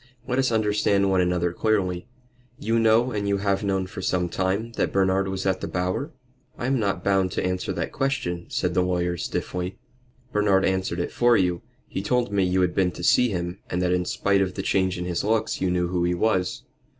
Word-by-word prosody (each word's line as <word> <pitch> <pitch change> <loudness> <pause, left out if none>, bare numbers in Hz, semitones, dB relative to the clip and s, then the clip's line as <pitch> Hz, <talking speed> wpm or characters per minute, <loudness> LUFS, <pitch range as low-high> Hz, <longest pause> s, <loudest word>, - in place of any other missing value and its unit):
"Let 130 +1 0
us 130 -2 +2
understand 105 -3 +2
one 95 -1 +3
another 90 -1 0
clearly. 95 -4 0 0.5
You 115 -5 0
know, 115 +3 +4
and 105 -2 -2
you 100 0 +2
have 100 0 0
known 95 -2 0
for 95 - -8
some 90 -1 0
time, 95 +6 -1
that 115 - -1
Bernard 95 0 +2
was 95 0 -3
at 95 -1 0
the - - -3
Bower?" 90 - -2 0.5
"I - - -4
am 130 0 +1
not 100 -4 -1
bound 95 -2 +2
to - - -1
answer 90 0 -1
that - - -3
question," 90 -11 -2
said - - -1
the 90 - +3
lawyer, 90 -1 0
stiffly. 90 +1 -4 0.6
"Bernard 100 -2 +3
answered 95 -2 -1
it 85 - -2
for 120 -1 +4
you. 90 -2 +1 0.3
He - - -4
told 120 +1 0
me 100 -1 +2
you 90 +1 +2
had 90 -1 +1
been 95 -2 +2
to 85 - -8
see 125 +7 +4
him, 90 -2 -3
and 90 - -1
that 90 0 +2
in 90 0 0
spite 100 +1 +1
of 95 -1 -1
the - - -3
change 95 -1 +1
in 90 - -4
his 90 -2 -2
looks 110 +1 0
you 95 - +1
knew 90 -1 0
who 90 -1 0
he 90 0 +1
was." 95 -2 0
95 Hz, 220 wpm, -25 LUFS, 90-105 Hz, 0.6 s, know